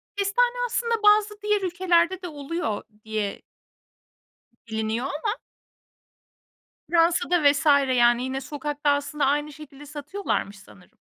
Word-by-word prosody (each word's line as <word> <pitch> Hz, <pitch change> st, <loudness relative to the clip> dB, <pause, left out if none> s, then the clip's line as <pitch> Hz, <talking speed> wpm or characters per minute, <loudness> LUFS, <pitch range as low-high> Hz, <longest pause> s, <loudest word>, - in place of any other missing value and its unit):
Kestane 460 Hz, +5 st, +1 dB
aslında 465 Hz, -2 st, -1 dB
bazı 420 Hz, 0 st, +4 dB
diğer 420 Hz, -1 st, +1 dB
ülkelerde 360 Hz, 0 st, +1 dB
de 360 Hz, -, -5 dB
oluyor 290 Hz, -6 st, -4 dB, 0.2 s
diye 215 Hz, -2 st, -3 dB, 1.3 s
biliniyor 220 Hz, +2 st, -2 dB
ama. 410 Hz, -, -3 dB, 1.5 s
Fransa'da 340 Hz, 0 st, +2 dB
vs. 285 Hz, +2 st, +3 dB, 0.3 s
yani, 240 Hz, 0 st, +4 dB
yine 265 Hz, +1 st, -3 dB
sokakta 290 Hz, +2 st, -3 dB
aslında 285 Hz, 0 st, 0 dB
aynı 295 Hz, +2 st, 0 dB
şekilde 290 Hz, -1 st, -12 dB
satıyorlarmış 290 Hz, -, -4 dB
sanırım. 105 Hz, -, -19 dB
300 Hz, 110 wpm, -25 LUFS, 270-380 Hz, 1.5 s, bazı